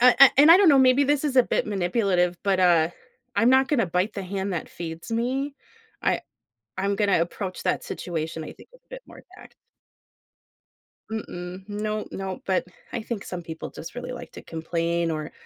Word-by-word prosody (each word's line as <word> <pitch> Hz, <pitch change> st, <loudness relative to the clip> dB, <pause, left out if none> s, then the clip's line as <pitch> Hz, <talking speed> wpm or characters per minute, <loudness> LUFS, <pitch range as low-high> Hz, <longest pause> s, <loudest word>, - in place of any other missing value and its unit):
Uh, 250 Hz, 0 st, +8 dB
an 275 Hz, -1 st, +10 dB
and 295 Hz, +3 st, +8 dB
I 340 Hz, -, +11 dB
don't 390 Hz, -3 st, +5 dB
know, 280 Hz, -, +7 dB
maybe 265 Hz, +2 st, +5 dB
this 290 Hz, +1 st, +1 dB
is 270 Hz, -3 st, -1 dB
a 255 Hz, -, +8 dB
bit -, -, -1 dB
manipulative, 180 Hz, -3 st, +1 dB
but, 195 Hz, -2 st, +1 dB
uh, 170 Hz, -2 st, +4 dB, 0.4 s
I'm 230 Hz, +2 st, +4 dB
not 265 Hz, +1 st, +4 dB
gonna 240 Hz, -10 st, +2 dB
bite 180 Hz, +5 st, 0 dB
the 200 Hz, -, -4 dB
hand 195 Hz, +1 st, -3 dB
that 170 Hz, -, -4 dB
feeds 165 Hz, +3 st, -7 dB
me. 265 Hz, +5 st, -1 dB, 0.5 s
I -, -, +1 dB, 0.6 s
I'm 200 Hz, +1 st, 0 dB
gonna 200 Hz, -5 st, +2 dB
approach 185 Hz, +2 st, -4 dB
that -, -, 0 dB
situation, 160 Hz, -2 st, -4 dB
I -, -, -8 dB
think, -, -, -17 dB
a -, -, -17 dB
bit -, -, -9 dB
more -, -, -14 dB
tact -, -, -15 dB, 1.5 s
Mm-mm, 185 Hz, -3 st, -6 dB
no, 215 Hz, +1 st, -3 dB
no, 190 Hz, -1 st, -5 dB
but 190 Hz, -1 st, +1 dB, 0.3 s
I 240 Hz, -, -2 dB
think 215 Hz, -2 st, -5 dB
some 180 Hz, -1 st, -6 dB
people 160 Hz, -1 st, -7 dB
just 165 Hz, -, -9 dB
really 245 Hz, +1 st, -6 dB
like 250 Hz, -, -9 dB
to -, -, -10 dB
complain 165 Hz, +1 st, -2 dB
or, 155 Hz, -1 st, -4 dB
195 Hz, 190 wpm, -25 LUFS, 175-250 Hz, 1.5 s, I